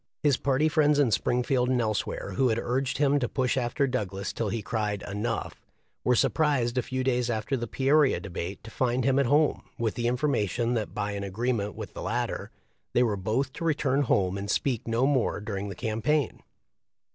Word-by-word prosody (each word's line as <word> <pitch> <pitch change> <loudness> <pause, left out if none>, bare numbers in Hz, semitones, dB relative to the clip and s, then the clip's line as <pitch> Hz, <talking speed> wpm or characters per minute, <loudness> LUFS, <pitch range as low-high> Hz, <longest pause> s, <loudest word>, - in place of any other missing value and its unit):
His 145 -3 +4
party 140 +3 +2
friends 150 -2 +3
in 140 -5 +3
Springfield 125 +4 +1
and 130 -1 +2
elsewhere, 110 -3 -2
who 125 +7 +2
had 110 - +1
urged 125 +2 -1
him 145 0 +3
to 120 - -1
push 130 -2 0
after 130 +2 +1
Douglas 100 -7 -3
till 115 -3 -2
he 115 0 -3
cried, 105 -3 -2
"enough," 105 +3 -3 0.4
were 125 - +3
surprised 135 -5 +2
a - - +2
few 130 +2 -3
days 125 -2 +1
after 110 +4 -1
the 120 -2 -3
Peoria 140 +4 +3
debate 95 -1 -6
to 110 - -10
find 125 0 0
him 135 0 +3
at 140 - +2
home, 150 +3 +3 0.2
with 115 -2 0
the 120 -1 -1
information 120 -3 0
that 110 -3 -2
by 105 - -1
an 100 -1 -4
agreement 105 +1 -2
with - - -7
the - - -7
latter - - -2 0.4
they 125 - +4
were 110 -4 +1
both 115 +8 -1
to - - -6
return 145 -4 +1
home 100 -7 +1
and 100 +1 -5
speak 120 0 0
no 115 +3 +2
more 135 -6 +1
during 100 -2 -4
the 95 - -6
cam 110 +3 -3
paign. 150 +1 +1
120 Hz, 200 wpm, -27 LUFS, 110-135 Hz, 0.4 s, His